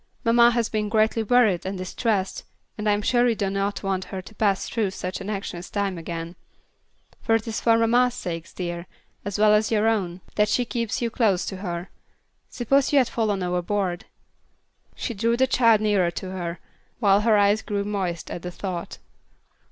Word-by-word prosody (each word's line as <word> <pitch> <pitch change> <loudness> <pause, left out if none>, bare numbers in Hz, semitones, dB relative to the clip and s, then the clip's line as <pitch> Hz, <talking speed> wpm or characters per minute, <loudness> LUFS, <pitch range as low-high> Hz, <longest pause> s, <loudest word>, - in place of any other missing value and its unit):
Mamma 235 +1 +6
has 235 -2 +1
been 210 -1 -2
greatly 220 +1 +2
worried 220 -5 +3
and 190 +1 -4
distressed, 190 +1 -2 0.3
and 210 0 -1
I - - +4
am 205 0 -1
sure 245 +2 +3
you 230 - +1
do 200 -2 -1
not 200 +1 -2
want 190 -1 -1
her 190 - -6
to 190 +4 -11
pass 200 -2 +1
through 220 -4 -1
such 185 0 -5
an 195 - -5
anxious 190 -4 -5
time 200 -3 -2
again. 165 +1 -6 0.9
It 225 0 +2
is 220 - -3
for 230 -1 +4
mamma's 240 +2 +3
sake, 165 -2 -5
dear, 175 -1 -4 0.4
as 200 0 -3
well 210 0 +5
as 210 0 +3
your 220 -1 +2
own, 190 -5 -1 0.2
that 210 0 +3
she 245 - +1
keeps 230 -1 -2
you 230 - -1
close 210 -7 +2
to 190 - -5
her. 175 -1 -5 0.6
Suppose 270 +3 +1
you 290 - +4
had 255 -4 +4
fallen 210 -5 -1
overboard." 180 0 -1 0.9
She 235 - -4
drew 230 +3 +1
the 260 - +4
child 230 -4 +4
nearer 205 -5 +2
to 185 +2 -6
her, 175 -2 -4 0.4
while 200 -3 +4
her 220 -1 +4
eyes 205 +1 +3
grew 200 -1 -2
moist 190 -5 -3
at 175 - -5
the 180 - -5
thought. 180 -1 -5
205 Hz, 190 wpm, -24 LUFS, 185-225 Hz, 0.9 s, Mamma